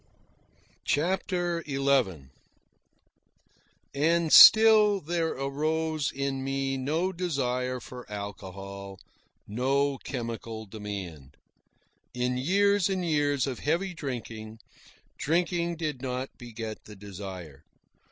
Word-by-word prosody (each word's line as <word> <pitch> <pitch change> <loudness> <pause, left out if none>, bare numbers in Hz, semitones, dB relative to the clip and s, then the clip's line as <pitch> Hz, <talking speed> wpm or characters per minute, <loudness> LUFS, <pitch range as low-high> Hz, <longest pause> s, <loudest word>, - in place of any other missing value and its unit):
CHAPTER 175 +1 0
XI 135 - +1 1.6
And 160 +3 +2
still 215 -2 +9
there 165 0 -1
arose 155 +2 -1
in 135 -1 -3
me 135 0 -1
no 155 +8 -1
desire 130 -7 -1
for 125 -2 -11
alcohol, 100 -1 -7 0.5
no 135 +5 0
chemical 115 -3 -5
demand. 95 -10 -8 0.8
In 125 0 0
years 200 +7 +2
and 185 -2 -1
years 145 -4 +1
of 130 -4 -4
heavy 175 +5 -1
drinking, 115 -7 -6 0.6
drinking 170 +1 0
did 150 -6 -3
not 130 0 -4
beget 115 -2 -8
the 105 - -11
desire. 95 -7 -9
135 Hz, 95 wpm, -28 LUFS, 110-165 Hz, 1.6 s, still